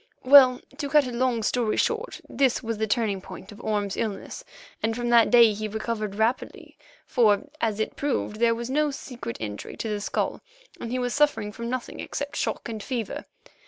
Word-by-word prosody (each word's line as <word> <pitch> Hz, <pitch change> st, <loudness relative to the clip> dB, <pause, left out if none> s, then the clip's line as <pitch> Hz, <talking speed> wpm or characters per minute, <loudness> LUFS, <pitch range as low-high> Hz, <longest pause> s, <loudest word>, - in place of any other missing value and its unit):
Well, 255 Hz, -2 st, +8 dB, 0.2 s
to 285 Hz, -, -2 dB
cut 300 Hz, -2 st, +5 dB
a 250 Hz, -, -4 dB
long 240 Hz, -2 st, 0 dB
story 230 Hz, -1 st, 0 dB
short, 465 Hz, +1 st, -1 dB
this 265 Hz, -2 st, +1 dB
was 225 Hz, -2 st, -3 dB
the 220 Hz, -, 0 dB
turning 210 Hz, -3 st, 0 dB
point 190 Hz, +1 st, -10 dB
of 205 Hz, -, -12 dB
Orme's 205 Hz, -2 st, -1 dB
illness, 220 Hz, -, -4 dB, 0.4 s
and 225 Hz, +1 st, 0 dB
from 240 Hz, 0 st, -2 dB
that 235 Hz, -1 st, +6 dB
day 235 Hz, -3 st, +7 dB
he 215 Hz, +1 st, -4 dB
recovered 215 Hz, -1 st, -3 dB
rapidly, 225 Hz, +4 st, -2 dB, 0.3 s
for, 215 Hz, -4 st, +3 dB, 0.2 s
as 220 Hz, -2 st, 0 dB
it 220 Hz, -, -2 dB
proved, 275 Hz, -6 st, -2 dB
there 230 Hz, 0 st, +3 dB
was 235 Hz, 0 st, -5 dB
no 300 Hz, +2 st, +2 dB
secret 250 Hz, -, -7 dB
injury 105 Hz, -2 st, -6 dB
to 225 Hz, -, -3 dB
the 210 Hz, -1 st, -2 dB
skull, -, -, -2 dB, 0.4 s
and 230 Hz, -, -5 dB
he 255 Hz, -, -1 dB
was 245 Hz, -1 st, -1 dB
suffering 290 Hz, -8 st, +2 dB
from 235 Hz, +2 st, -6 dB
nothing 255 Hz, -1 st, -4 dB
except 285 Hz, 0 st, -5 dB
shock -, -, -2 dB
and 220 Hz, -2 st, -5 dB
fever. 235 Hz, -2 st, -4 dB
230 Hz, 195 wpm, -26 LUFS, 215-255 Hz, 0.4 s, Well